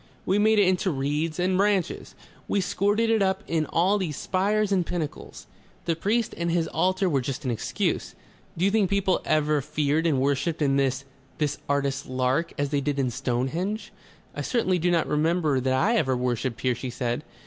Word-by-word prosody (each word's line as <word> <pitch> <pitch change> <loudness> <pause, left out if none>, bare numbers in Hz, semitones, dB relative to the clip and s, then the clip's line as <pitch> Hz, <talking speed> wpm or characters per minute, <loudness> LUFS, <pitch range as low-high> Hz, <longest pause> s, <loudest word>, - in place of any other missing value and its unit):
We 195 +3 +2
made 215 +1 +4
it 205 -2 +5
into 185 +1 +1
reeds 150 +2 -1
and 185 +1 +1
branches. 195 -4 0 0.3
We 200 - +1
squirted 205 +4 +1
it 220 -2 +3
up 190 -1 +1
in 160 -2 -1
all 190 +5 +2
these 160 -7 -3
spires 205 +2 0
and 190 -3 +3
pinnacles. 170 -3 -5 0.4
The 165 - +1
priest 215 +7 0
and 170 0 -2
his 165 -1 +1
altar 185 +4 +1
were 140 -6 +1
just 135 +3 -5
an 125 - 0
excuse. 115 - -2 0.4
Do 175 - +1
you 200 - +3
think 210 -3 +2
people 195 -2 +2
have - - -13 0.2
ever 150 -1 +1
feared 150 +3 0
and 145 -5 +2
worshipped 140 +4 0
in 135 -1 +2
this 135 0 0 0.3
this 150 -1 -1
artist's 140 -1 0
lark 130 +5 0
as 145 0 0
they 145 0 0
did 145 0 -1
in 130 -3 0
Stonehenge?" 155 - -2 0.4
"I - - -4
certainly 190 -8 +1
do 175 +2 +1
not 170 -2 +2
remember 155 -2 +1
that 130 +1 0
I 225 - +2
ever 130 - +1
worshipped 125 -1 -2
here," 130 -1 +2
she 125 +2 -5
said. 120 +2 -2
160 Hz, 195 wpm, -26 LUFS, 135-190 Hz, 0.4 s, it